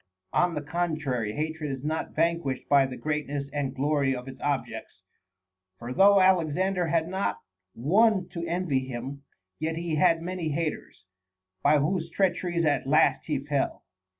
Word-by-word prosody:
On 175 -1 +2
the 150 - -3
contrary, 145 -9 -2
hatred 155 +2 -3
is 135 -1 -5
not 155 +2 -3
vanquished 165 -5 0
by 140 -2 +5
the 130 - -7
great 150 -1 -2
ness 140 0 -2
and 140 -2 -2
glory 140 -1 +1
of 125 +1 -7
its 130 -1 -10
objects. 135 -5 -3 0.7
For 120 +4 -6
though 200 +5 +6
Alexander 185 0 +2
had 165 0 +1
not 190 +2 -1 0.4
one 190 - +3
to 170 - -5
envy 160 -7 -1
him, 130 +3 -6 0.4
yet 160 +1 -2
he 165 -1 -2
had 165 -1 +3
many 180 -2 -3
haters, 155 - -4 0.6
by 150 +1 +5
whose 165 +3 0
treacheries 175 -2 0
at 145 -3 +1
last 155 +3 +3
he 150 -3 0
fell. 145 -2 -1
155 Hz, 155 wpm, -27 LUFS, 140-170 Hz, 0.7 s, though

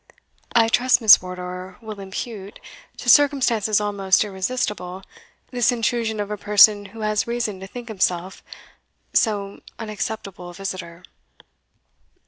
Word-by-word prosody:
"I 230 -1 +5
trust 245 +2 +3
Miss 220 -3 +8
Wardour 180 0 -7
will 215 -3 -9
impute, 195 +1 -7 0.4
to - - -9
circumstances 245 -7 +4
almost 200 -2 +1
irresistible, 190 -2 -4 0.5
this 245 -1 +2
intrusion 230 -2 -1
of 205 0 -3
a 210 - -3
person 205 0 +5
who 220 +3 -11
has 215 +2 0
reason 235 -5 -2
to 190 - -9
think 240 +3 -9
himself 185 -3 -2 0.7
so 200 -3 0 0.2
unacceptable 210 -4 -6
a 175 - -12
visitor." 185 -3 -7
210 Hz, 120 wpm, -22 LUFS, 190-230 Hz, 0.7 s, Miss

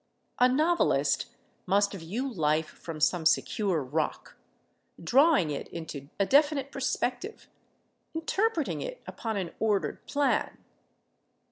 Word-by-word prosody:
A 250 +1 +6
novelist 315 +7 +2 0.4
must 200 +2 +2
view 200 +9 -4
life 160 - +1
from 165 -2 -8
some 160 +2 +2
secure 175 0 +1
rock, 150 +5 -3 0.6
drawing 270 - +4
it 140 - -4
into 150 -4 -8
a 200 - +3
definite 280 +1 +3
perspective, 265 - -3 0.7
interpreting 335 +1 0
it - - -6
upon 220 -2 -4
an 180 -4 -3
ordered 200 -8 0
plan. 285 -1 0
215 Hz, 110 wpm, -28 LUFS, -, 0.7 s, A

